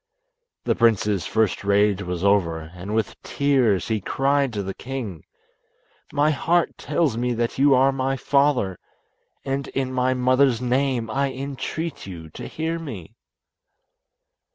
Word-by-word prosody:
The - - +2
prince's 105 -4 +2
first 110 -3 +1
rage 100 0 +3
was 90 -1 -4
over, 85 -6 +1
and 95 +4 -5
with 110 -2 -2
tears 130 -10 +1
he 110 -2 0
cried 135 +4 +1
to 100 -2 -2
the 95 0 -4
king, 120 - -6 0.9
"My 150 +1 +3
heart 170 +4 +1
tells 150 -10 0
me 120 0 0
that 120 +2 -2
you 140 0 +6
are 135 +2 +4
my 135 0 -1
father, 135 -9 +1 0.7
and 135 +1 -2
in 130 -1 -2
my 130 0 +1
mother's 130 -1 +3
name 125 -1 0
I 140 +1 0
entreat 140 - -5
you 80 -4 -9
to - - -8
hear 165 +1 -3
me." 110 - -8
125 Hz, 140 wpm, -23 LUFS, 100-140 Hz, 0.9 s, you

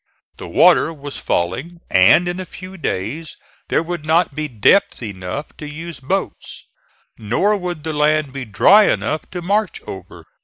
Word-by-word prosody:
The - - -8
water - - +4
was 145 -3 -8
falling, 130 - -2
and 175 - +5
in 175 +1 -3
a - - -3
few 185 +2 -11
days 145 - -4 0.3
there - - +1
would 170 -2 -5
not 160 0 +2
be 155 +2 -3
depth 125 - +2
enough 100 +6 -6
to 150 - -7
use 165 +3 -8
boats; 185 +9 -4 0.5
nor 120 - +1
would 180 -5 -5
the 160 -1 -3
land 150 -2 +1
be 135 -1 -5
dry 195 - +5
enough 155 - -1
to 180 -1 -6
march 205 +2 0
over. 95 -1 -10
155 Hz, 160 wpm, -19 LUFS, 130-175 Hz, 0.5 s, and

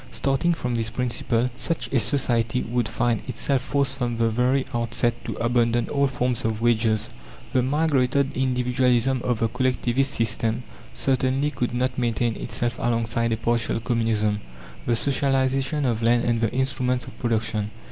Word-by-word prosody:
Starting 135 +5 +1
from 125 -7 -2
this 115 -1 0
principle, 120 0 0
such 135 -5 -2
a 130 - +4
society 125 -2 +1
would 120 0 -1
find 120 +2 0
itself 135 -2 0
forced 135 0 -1
from 120 -1 -1
the 115 0 +2
very 125 +4 +2
outset 120 0 +1
to - - -4
abandon 115 0 +1
all 140 -1 +2
forms 125 -2 -1
of 110 -1 -1
wages. 110 -1 +1 0.4
The 130 - +4
migrated 140 -1 +1
individualism 125 0 +1
of 125 -2 0
the 115 - +3
Collectivist 130 +2 0
system 115 0 0 0.3
certainly 130 +3 +1
could 120 -4 -2
not 125 +1 -1
maintain 120 -1 0
itself 120 +1 -3
alongside 115 0 0
a 110 - +1
partial 115 0 0
communism 110 -3 0 0.5
the 120 - +3
socialization 135 +2 +1
of 115 -3 0
land 120 +1 +3
and 115 -1 +1
the 115 - +2
instruments 130 -1 0
of - - -11
production. 110 -3 -1
120 Hz, 155 wpm, -24 LUFS, 115-130 Hz, 0.5 s, a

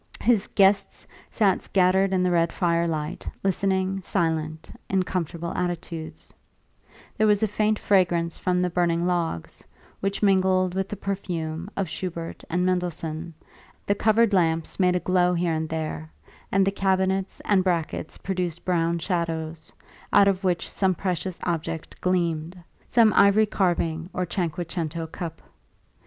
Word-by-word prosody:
His 225 -4 +3
guests 195 0 +2 0.2
sat 200 -4 +2
scattered 190 +1 +2
in 185 -1 +2
the 180 - +2
red 170 -1 +2
firelight, 170 -3 -1
listening, 190 0 0
silent, 160 -4 -2 0.2
in 190 -1 +2
comfortable 170 -2 -3
attitudes; 165 -3 -5 0.8
there 215 - +3
was 210 0 +3
a - - +4
faint 215 +1 +1
fragrance 175 -5 +2
from 180 0 0
the 180 - 0
burning 170 -1 +1
logs, 170 - -2 0.4
which 195 +2 -2
mingled 185 -2 +3
with 190 0 -2
the - - -4
perfume 175 -4 -4
of 195 -2 0
Schubert 165 0 -5
and 180 +2 +1
Mendelssohn; 170 -2 -2 0.5
the 200 - +2
covered 220 +1 +3
lamps 165 -2 +1
made 180 -1 +3
a - - +2
glow 180 0 +2
here 170 -1 0
and 160 0 -2
there, 160 0 -4 0.4
and 195 0 +3
the 195 - +2
cabinets 190 0 0
and 195 -3 +3
brackets 170 -3 -2
produced 180 -3 -3
brown 170 -2 +1
shadows, 165 -2 -3 0.4
out 200 - +6
of 195 0 +1
which 180 -2 0
some 190 -2 +1
precious 185 0 -3
object 165 -1 -4
gleamed 170 -2 0 0.3
some 230 -3 +4
ivory 200 +2 +6
carving 170 -4 0
or 180 - -1
cinque 175 -1 -2
cento 165 -1 -3
cup. 165 0 -7
180 Hz, 145 wpm, -25 LUFS, 165-190 Hz, 0.8 s, out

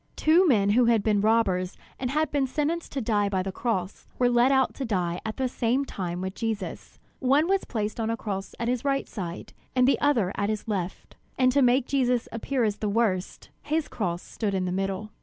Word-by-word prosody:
Two 340 +4 +4
men 205 -8 +4
who 245 +3 +4
had 230 -3 +3
been 210 -2 +2
robbers 200 -4 +1 0.2
and 255 - -2
had 305 +2 0
been 280 -2 +1
sentenced 310 +5 -2
to 275 - -2
die 210 -3 +1
by 190 -2 0
the 195 - -3
cross, 190 -3 -3
were 245 -1 +3
led 240 +2 +4
out 265 -1 +3
to 275 - -5
die 180 -7 -1
at 220 -1 -5
the 260 - +1
same 250 +2 0
time 180 -6 -4
with 190 0 -3
Jesus. 215 -3 -4 0.2
One 280 +5 +3
was 390 0 +1
placed 215 -1 -3
on 225 0 -1
a 230 - -1
cross 195 -3 -5
at 235 - -1
his 245 0 0
right 275 -1 0
side, 175 -5 -6 0.2
and 250 0 +4
the 275 - +2
other 235 -11 +2
at 200 +1 -1
his 215 0 -3
left; 190 -4 -4 0.2
and 255 -1 +4
to 280 +2 +3
make 250 0 +4
Jesus 250 -3 +1
appear 245 +2 -1
as 210 -2 0
the 210 - -2
worst, 200 -4 -1
his 310 +1 -1
cross 175 -6 -3
stood 205 -3 -3
in 185 -1 0
the 180 - -2
middle. 195 +2 -2
230 Hz, 220 wpm, -26 LUFS, 195-260 Hz, 0.2 s, Two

